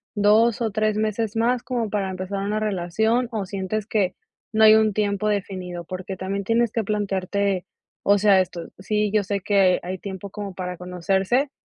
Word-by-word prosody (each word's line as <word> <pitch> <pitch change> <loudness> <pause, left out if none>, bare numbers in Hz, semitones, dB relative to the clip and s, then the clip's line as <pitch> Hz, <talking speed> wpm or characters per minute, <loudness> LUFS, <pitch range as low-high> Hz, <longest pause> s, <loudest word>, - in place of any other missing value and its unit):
2 215 +3 +4
o 225 - 0
3 215 0 0
meses 215 +1 -1
más 240 +2 +1
como 245 -3 -2
para 200 -2 -1
empezar 185 +1 -4
una 210 +2 -1
relación 215 +4 0
o 215 -3 -2
sientes 195 +2 -3
que 205 -4 0 0.4
no 220 0 +3
hay 215 - +9
un 220 -1 +4
tiempo 205 0 0
definido? 185 -4 -3
Porque 185 +2 -6
también 195 +1 -3
tienes 230 +2 +2
que 225 - 0
plantearte, 200 -2 -1 0.4
o 205 0 +4
sea, 200 -2 +5
esto, 175 -2 -5
sí, 210 +2 0
yo 210 -1 +3
sé 200 +1 -2
que 195 -2 +3
hay 185 +1 -5
tiempo 195 0 -7
como 205 -2 -6
para 180 0 -5
conocerse, 190 +9 0
200 Hz, 180 wpm, -23 LUFS, 190-215 Hz, 0.4 s, hay